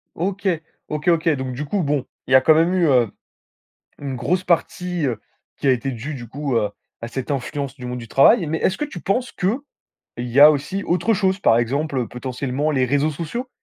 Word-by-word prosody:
OK. 195 +3 -2 0.4
OK 150 +3 -3
OK, 165 -1 +3
donc 130 -4 -2
du 140 +4 -4
coup 190 +6 -1
bon, 145 -3 0 0.2
il - - -4
y - - +6
a 130 - +9
quand 155 - +6
même 165 +3 +3
eu, 180 -2 +3
heu, 125 -4 +4 0.9
une 140 -2 -5
grosse 180 +8 0
partie, 175 -1 0
heu, 120 -5 -2 0.4
qui - - -4
a 135 - +6
été 130 +2 -1
dûe 130 +5 -5
du 120 -3 -8
coup, 140 +2 -3
heu, 105 -3 +1 0.3
à 115 - -5
cette 130 +2 -5
influence 140 0 -3
du 125 -2 -9
monde 125 0 -4
du 115 - -8
travail 165 - +5
mais 160 +2 -1
est-ce 190 - +1
que - - -2
tu 280 -12 -8
penses 245 +8 -1
qu'il 185 - 0 0.7
y 120 +2 0
a 150 +1 +11
aussi 155 +7 -1
autre 180 +5 +1
chose? 190 -1 +1
Par 115 - +4
exemple, 140 +5 -1
heu, 125 -3 -1
potentiellement 130 +4 -3
les 130 -3 +2
réseaux 145 +4 +1
sociaux 205 - -5
145 Hz, 220 wpm, -21 LUFS, 130-175 Hz, 0.9 s, a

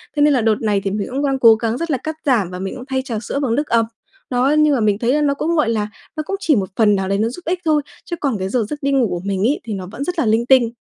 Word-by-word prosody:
thế 295 - +1
nên 295 0 +5
là 255 - +2
đợt 220 -1 +3
này 210 -3 +1
thì 195 - -1
mình 205 0 -2
cũng 275 +3 -1
đang 270 -1 0
cố 230 -3 +7
gắng 225 +1 -2
rất 335 +3 -3
là 270 - +1
cắt 315 +5 -5
giảm 235 -10 +2
và 180 0 -7
mình 190 +1 -4
cũng 255 - -8
thay 265 0 -1
trà 255 -4 -4
sữa 280 - -3
bằng 255 -5 0
nước 295 +3 -1
ầm. 230 -1 +2 0.4
Đó, 250 +1 +2
nhưng 305 -1 +4
mà - - 0
mình 210 -1 +2
thấy 240 +2 +1
là 300 - +2
nó 285 -1 +2
cũng, 325 +4 -1
gọi 305 -8 +2
là, 215 -2 0 0.3
nó 310 - -1
cũng 390 - -2
chỉ 320 -6 +2
một 195 -4 -1
phần 210 -3 +4
nào 190 -1 -1
đấy 195 - +1
nó 220 +2 +1
giúp 305 +9 -9
ích 355 +2 -1
thôi, 305 -2 +3 0.2
chứ 345 - -4
còn 270 -7 0
cái 190 0 -2
giờ 230 +1 0
giấc 295 - -5
đi 280 - +1
ngủ 265 -4 +3
của 175 -1 -3
mình 195 -1 -1
ấy 270 +7 +2
thì 220 - -5
nó 185 -2 -5
vẫn 255 - -5
rất 355 +3 -3
là - - +2
linh 225 +2 +2
tinh. 255 -2 +5
245 Hz, 345 wpm, -19 LUFS, 215-290 Hz, 0.4 s, cố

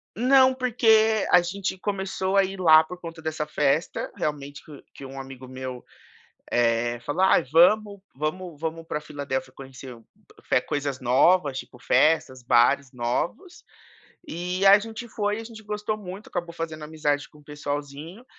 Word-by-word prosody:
Não, 260 +2 +5
porque 220 -4 +3
a 180 - +7
gente 190 +2 -4
começou 190 0 -2
a 195 - +5
ir 195 0 -5
lá 160 -3 +7
por 180 +3 -10
conta 165 -2 -9
dessa 155 -1 -3
festa, 150 +1 -1
realmente 145 -1 -4
que 145 -3 -13
que 140 - -10
um 135 0 -8
amigo 135 -1 -10
meu, 130 -1 -7 0.7
eh, 120 0 +1
falou: 170 +6 -1
"Ai, - - +4
vamos 200 +5 +4 0.2
vamos 155 +2 -4
vamos 165 0 -4
pra 150 - -3
Filadelfia, 135 -3 -5
conhecer 130 -2 -11 0.5
fe - - +2
coisas 140 -2 -3
novas, 140 +3 +3
tipo, 125 - -12
festas, 130 +1 +2
bares 130 +3 +3
novos", 125 - -3 0.7
e 180 +3 -3
a 200 +1 +9
gente 225 +3 -8
foi 210 -1 -2
e - - -5
a - - -8
gente 220 -1 -11
gostou 210 0 -3
muito. 200 0 -9
Acabou 175 -2 -4
fazendo 160 -2 -6
amizade 150 -3 -2
com 150 - -19
o 150 - -20
pessoalzinho 145 - -6
160 Hz, 160 wpm, -25 LUFS, 140-195 Hz, 0.7 s, a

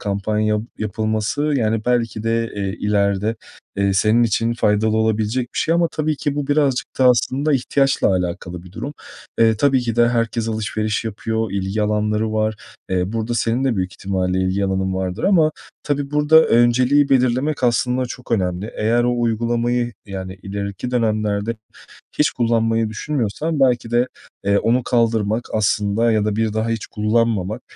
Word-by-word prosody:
kampanya 105 +1 0 0.2
yapılması, 110 +5 -1
yani 115 -7 0
belki 115 -3 0
de, 115 0 0
eee, 100 -1 -2
ileride, 105 +1 0 0.4
eee, 100 0 +1
senin 110 +4 +3
için 115 +1 +1
faydalı 110 -1 +1
olabilecek 110 +2 0
bir - - -2
şey 165 - +1
ama 170 -1 +2
tabii 155 -1 -2
ki 145 -1 -2
bu 145 -2 -2
birazcık 145 -3 +1
da 130 - +3
aslında 130 +5 +2
ihtiyaçla 135 0 +2
alakalı 90 -1 -3
bir 90 0 -14
durum. 140 +8 -5 0.5
Eee, 110 -1 +4
tabii 135 +1 +3
ki 120 -2 -3
de 120 0 +5
herkes 115 -1 -1
alışveriş 110 0 -2
yapıyor, 110 0 -2
ilgi 100 +2 -2
alanları 105 +1 0
var. 110 0 0 0.4
Eee, 90 +2 0
burada 115 +1 -2
senin 120 +3 0
de 125 -5 +1
büyük 95 0 -2
ihtimalle 95 -1 -2
ilgi 95 +2 0
alanın 95 0 -1
vardır 95 -1 -3
ama 165 -6 +4 0.3
tabii 145 -1 -2
burada 150 +2 +5
önceliği 125 +4 +3
belirlemek 130 +2 +1
aslında 125 +1 +1
çok 125 0 -7
önemli. 95 -1 -1
Eğer 115 +3 +2
o 120 0 0
uygulamayı, 120 +1 0
yani 95 -1 -6
ileriki 100 +4 -5
dönemlerde 110 -2 0 0.6
hiç 150 - +4
kullanmayı 115 -2 +1
düşünmüyorsan 145 +5 -2
belki 120 -3 +2
de, 120 +2 +2 0.4
eee, 100 0 +3
onu 120 +3 +1
kaldırmak 115 -1 +1
aslında 110 +2 +1
ya 105 -1 +1
da 105 -1 -1
bir 110 -1 0
daha 110 +1 -1
hiç 115 -1 -2
kullanmamak 110 0 0
115 Hz, 160 wpm, -20 LUFS, 105-125 Hz, 0.6 s, de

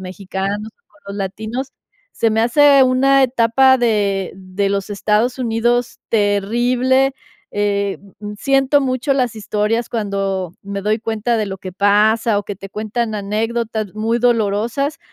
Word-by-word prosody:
mexicanos, 195 +3 -4 0.2
con 205 - -27
los 200 - -6
latinos. 220 +7 -4 0.4
Se 230 - +1
me 220 +1 +1
hace 280 +3 +5
una 270 +1 +4
etapa 260 +1 +4
de 205 -5 0
de 190 +1 -2
los 200 +1 -2
Estados 215 +5 0
Unidos 240 0 0
terrible, 240 +6 +2 0.4
eh, 200 -1 0 0.2
mm, 210 0 -6
siento 270 +3 +3
mucho 260 +1 0
las 250 -4 0
historias 215 +2 -1
cuando 195 -5 -2
me 200 0 -5
doy 215 +2 +1
cuenta 225 +1 -1
de 215 - -1
lo 190 - -5
que 185 -1 -8
pasa 210 +2 +3
o - - -3
que 205 - -6
te 195 +1 -10
cuentan 220 +3 -3
anécdotas 215 0 -2
muy 225 +2 0
dolorosas, 235 +4 0
220 Hz, 145 wpm, -18 LUFS, 200-245 Hz, 0.4 s, hace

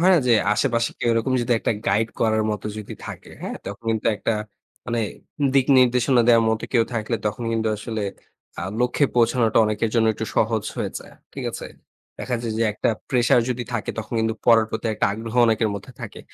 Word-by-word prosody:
হয় 180 +2 +5
না - - +5
যে, 120 - +5 0.2
আশেপাশে 115 +1 +1
কেউ - - 0
এরকম 115 +3 +1
যদি 120 - +1
একটা - - 0
গাইড 105 +3 +2
করার 110 -1 +2
মতো 105 -1 -4
যদি 105 - -7
থাকে, - - -9
হ্যাঁ? - - -4
তখন 100 +3 -8
কিন্তু 110 - -2
একটা 100 +3 -1 0.5
মানে 120 -1 -1 0.5
দিক 135 -2 +4
নির্দেশনা 125 0 +4
দেওয়ার 115 -1 +6
মতো 110 0 -1
কেউ 115 -2 +4
থাকলে 115 +1 -1
তখন 105 +3 -3
কিন্তু 110 -1 0
আসলে 110 +1 -4 0.6
আ - - -3 0.2
লক্ষ্যে 125 +4 +2
পৌঁছানোটা 115 -1 +3
অনেকের 110 +1 0
জন্য 115 -1 +3
একটু 110 - -4
সহজ 110 -1 +2
হয়ে - - -2
যায়। - - -14 0.2
ঠিক - - -5
আছে? - - -7 0.5
দেখা 125 - -2
যায় 115 - -2
যে, - - +2
একটা 105 - -1 0.2
প্রেশার 125 -1 +4
যদি 125 -1 -2
থাকে, 110 -4 -2
তখন 110 +1 -5
কিন্তু 110 0 0
পড়ার 115 -2 +5
প্রতি 110 - -3
একটা - - +1
আগ্রহ 115 +2 -6
অনেকের 110 -1 +2
মধ্যে 100 +6 -8
থাকে। 115 -3 -7
115 Hz, 200 wpm, -23 LUFS, 110-120 Hz, 0.6 s, দেওয়ার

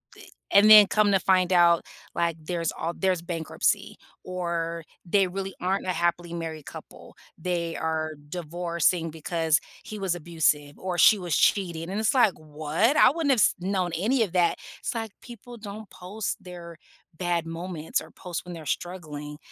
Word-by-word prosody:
The - - -14 0.3
and 205 +2 +7
then 210 -2 +10
come 210 -1 +3
to 195 - +4
find 185 -1 +2
out, 170 -1 +5 0.3
like 170 -1 0
there's 165 0 -2
all 165 +1 -2
there's 185 -3 +1
bankruptcy 170 -2 -1 0.3
or 170 -2 -3 0.2
they 195 +2 +3
really 195 +1 -5
aren't 190 +2 -1
a 185 - 0
happily 175 0 -1
married 160 -3 -5
couple. - - -12 0.2
They 170 -1 -2
are 160 -1 -2 0.2
divorcing 170 0 -1
because 160 0 0 0.3
he 215 - -7
was 190 -3 0
abusive 150 -3 0
or 185 -1 -4
she 215 - +7
was 175 -3 -1
cheating, 170 -4 +1
and 200 +3 -2
it's 220 - +2
like, 240 -7 +4
"What? 155 - 0
I 255 - +7
wouldn't 310 -2 0
have 260 - +3
s - - +4
known 185 -1 -1
any 230 +7 +2
of 190 -5 -5
that," 175 -2 +2 0.2
it's - - -3
like 225 -2 -4
people 240 0 -11
don't 210 -1 -9
post 200 +4 -5
their 175 -2 -9 0.4
bad 175 -1 -1
moments 165 -1 -3
or - - -13
post 180 -3 -6
when 180 - -7
they're 165 -2 -9
struggling, 150 -3 -5
175 Hz, 170 wpm, -26 LUFS, 165-195 Hz, 0.4 s, then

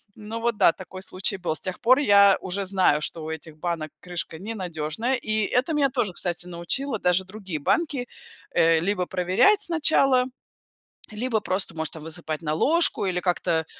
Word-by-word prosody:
Ну 220 +1 -6
вот 235 -1 -1
да, 170 - +6
такой 185 +1 -10
случай 190 +1 -1
был. 175 - -2
С - - -5
тех 185 -1 -5
пор 255 +3 +5
я 200 -7 +6
уже 190 +2 -3
знаю, 185 -6 +2
что 160 +1 -4
у 160 - -5
этих 160 0 -7
банок 165 -1 -3 0.2
крышка 175 -2 -5
не 215 +5 -5
надежная, 180 +6 -2
и 215 -1 +1
это 275 +6 +1
меня 285 -2 +2
тоже, 245 -8 -1
кстати, 175 -1 -1
научило, 210 +9 -2
даже 180 0 +2
другие 190 -4 -6
банки, 275 - 0 0.4
э, 165 -1 +4
либо 180 0 -1
проверять 190 - +3
сначала, 295 -7 +3 0.9
либо 220 +1 -1
просто, 185 -3 -1
может, 160 -1 -3
там 160 - -9
высыпать 160 -1 -5
на 155 -2 -2
ложку 285 - +2
или 180 -1 -1
как-то, 175 -2 0
190 Hz, 180 wpm, -24 LUFS, 170-230 Hz, 0.9 s, да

